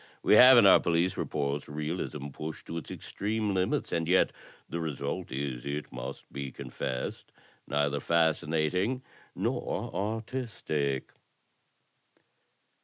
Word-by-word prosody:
We - - +5
have 125 +3 +10
in 115 - +8
our 95 - +8
police 85 +2 +1
reports 70 +1 -2
realism 75 -1 -4
pushed 75 +3 -7
to 85 - -5
its - - -11
extreme 105 0 -2
limits, 95 -1 0
and 80 -1 0
yet 90 +2 +4 0.4
the 85 - -4
result 80 +2 -3
is, 65 -2 -3
it 70 +1 -4
must 60 0 -7
be 70 -1 -4
confessed, 65 -1 -5 0.4
neither 70 0 +1
fascinating 85 - +1 0.3
nor - - -2
artistic." 105 - -2
80 Hz, 115 wpm, -30 LUFS, 70-95 Hz, 0.4 s, have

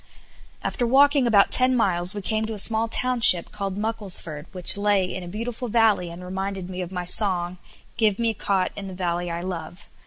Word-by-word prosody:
After 245 - -2
walking 280 +1 +3
about 205 -4 +3
ten 255 0 +5
miles 185 -4 +1
we 205 - -6
came 220 +2 -1
to 225 - -5
a - - -8
small 220 +2 +3
township 230 -7 +4
called 200 -2 -5
Mucklesford 200 -8 -2
which 180 -2 +3
lay 205 -2 +1
in 185 +1 -6
a 175 - -9
beautiful 230 +6 -6
valley, 220 -6 +1
and 170 +2 -10
reminded 190 0 -5
me 185 0 -6
of 180 0 -7
my 180 -1 -5
song, 180 -2 +1 0.4
"Give 215 -3 +1
me 230 -1 0
a - - -7
cot 195 -2 -1
in 200 -1 -7
the 190 - -9
valley 175 -1 -3
I 170 0 -5
love." 180 0 -8
195 Hz, 205 wpm, -23 LUFS, 180-225 Hz, 0.4 s, ten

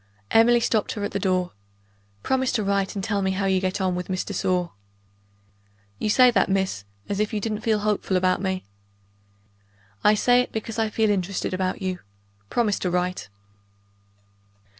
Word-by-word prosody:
Emily 240 +1 +5
stopped 225 -2 0
her 205 - -5
at 205 - -2
the 200 - -2
door. 185 -2 0 0.7
"Promise 260 -1 0
to 220 - 0
write 200 0 0
and 195 - -3
tell 205 -1 0
me 190 - +1
how 195 +1 -1
you 190 -1 +2
get 185 +1 -1
on 185 -1 0
with 180 0 -4
Miss 185 -1 -1
de 205 - -5
Sor." 180 -2 0 1.3
"You - - -1
say 250 +3 +6
that, 230 - +2
miss, 190 - -1 0.2
as 200 - -2
if 210 0 0
you 215 - -1
didn't 215 0 -3
feel 215 -2 +1
hopeful 205 -2 0
about 185 0 +1
me." 190 -1 -2 1.4
"I 210 - +5
say 245 +3 +4
it, 250 - -5
because 225 +1 -4
I 220 -1 +1
feel 215 0 +1
interested 190 -1 -2
about 185 +1 -2
you. 185 -1 -2 0.5
Promise 215 -4 +1
to 180 - -1
write." 180 - -2
200 Hz, 180 wpm, -24 LUFS, 185-215 Hz, 1.4 s, say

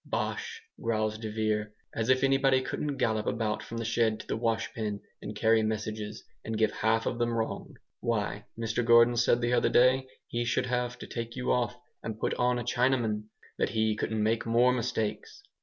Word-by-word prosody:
"Bosh!" 460 -1 -3 0.2
growls 110 -1 0
de 110 -1 -4
Vere, 105 -1 -1 0.2
"as 115 +1 -2
if 130 0 +4
anybody 135 -1 +4
couldn't 145 +1 -3
gallop 110 -4 0
about 110 -2 -1
from 115 +2 -7
the 115 - -3
shed 110 -1 +1
to - - -8
the - - -2
washpen, 115 -2 -1 0.2
and 105 - -6
carry 110 +1 +4
messages, 110 0 -3 0.2
and 110 -1 -3
give 110 -1 +3
half 110 +1 +1
of 120 - -2
them 120 0 +2
wrong! 115 -1 -3 0.2
Why, 105 -2 -1
Mr 115 +1 -1
Gordon 115 +1 +6
said 120 0 +3
the 120 +1 +1
other 120 - +3
day, 130 +1 +4 0.2
he 120 0 -2
should 120 - 0
have 125 0 -1
to - - -8
take 115 0 -5
you 125 -1 -1
off 120 -4 0 0.2
and 110 -1 -5
put - - 0
on 125 0 +1
a 120 - -2
Chinaman 120 -3 +1 0.3
that - - +2
he 110 -1 +1
couldn't 110 0 -1
make 115 +1 +1
more 120 +2 +4
mistakes." 115 - -3
115 Hz, 190 wpm, -29 LUFS, 110-120 Hz, 0.3 s, Gordon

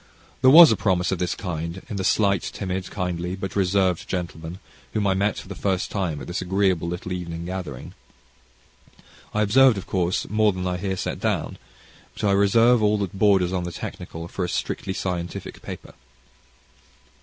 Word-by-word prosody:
There 130 - +7
was 160 +1 +10
a - - +3
promise 95 -3 +1
of 95 - -1
this 90 -1 -1
kind 85 0 -5
in 105 - -5
the 95 - -2
slight, 100 0 +2
timid, 95 -2 -4
kindly, 90 -1 -3
but 95 0 -6
reserved 95 -2 +1
gentleman, 85 -2 -4 0.4
whom 105 -2 0
I 95 - +3
met 100 +2 0
for - - -8
the 100 - -6
first 95 0 -1
time 90 -7 -2
at - - -7
this 90 +2 -4
agreeable 95 -2 +1
little 90 +1 -5
evening 85 -2 -4
gathering. 90 0 -6 1.4
I 105 - +1
observed, 125 +2 +5
of 95 - -5
course, 90 -1 -1
more 110 -1 +2
than 90 0 -4
I 90 -1 -1
here 95 0 -3
set - - -3
down; - - -2 0.6
but - - -8
I 100 - +3
reserve 115 +4 +4
all 105 0 +3
that 100 -4 -3
borders 95 -3 +3
on 90 -1 -1
the 90 - -4
technical 85 0 -7
for 90 - -4
a 90 - -2
strictly 95 - -3
scientific 90 -2 -4
paper. - - -9
95 Hz, 180 wpm, -24 LUFS, 90-100 Hz, 1.4 s, was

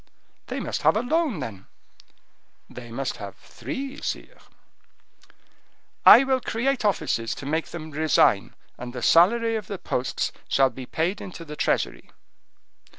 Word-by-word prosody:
"They - - -4
must - - -3
have - - +4
a - - +1
loan, 290 - 0
then." 110 -7 -7 1.0
"They 120 -1 -10
must 130 +3 -4
have 100 -2 -8
three, 275 +1 -7
sire." - - -5 1.7
"I 255 - +11
will 265 -1 +1
create 255 +4 -1
offices 155 - 0
to - - -9
make 160 +3 -1
them 160 -2 -8
resign, 145 -9 +2 0.2
and 120 0 -7
the 125 - -6
salary 225 +7 +4
of 210 -4 -7
the 200 - -5
posts 125 -7 -2 0.2
shall 135 -1 +3
be 125 +1 -9
paid 175 +6 -1
into 175 -3 -8
the 150 -1 -8
treasury." - - -1
160 Hz, 145 wpm, -25 LUFS, -, 1.7 s, I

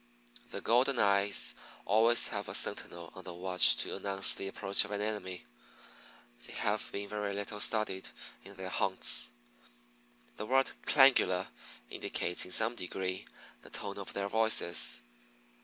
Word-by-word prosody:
The - - -7
Golden 125 +3 +1
eyes 100 - +1 0.3
always 115 +3 +3
have - - -6
a - - -4
sentinel 85 -1 -1
on 95 - -12
the 90 -1 -9
watch 90 +1 +5
to - - -2
announce 95 0 +3
the 95 - -7
approach 100 0 +2
of 105 - -10
an 105 -1 -4
enemy. 105 -4 -5 1.0
They - - -12
have - - -3
been 100 0 -6
very 105 -1 -5
little 105 +1 -6
studied 105 -3 -1 0.3
in 100 - -12
their 95 0 -7
haunts. 95 +1 0 1.1
The 105 - -7
word 135 +2 +1 0.2
Clangula 130 -10 +3 0.4
indicates 90 - -3
in 90 - -10
some 110 +5 +1
degree 95 -2 -5 0.3
the - - -14
tone - - -7
of - - -8
their 100 0 -3
voices. 110 -5 +4
100 Hz, 145 wpm, -31 LUFS, 95-110 Hz, 1.1 s, watch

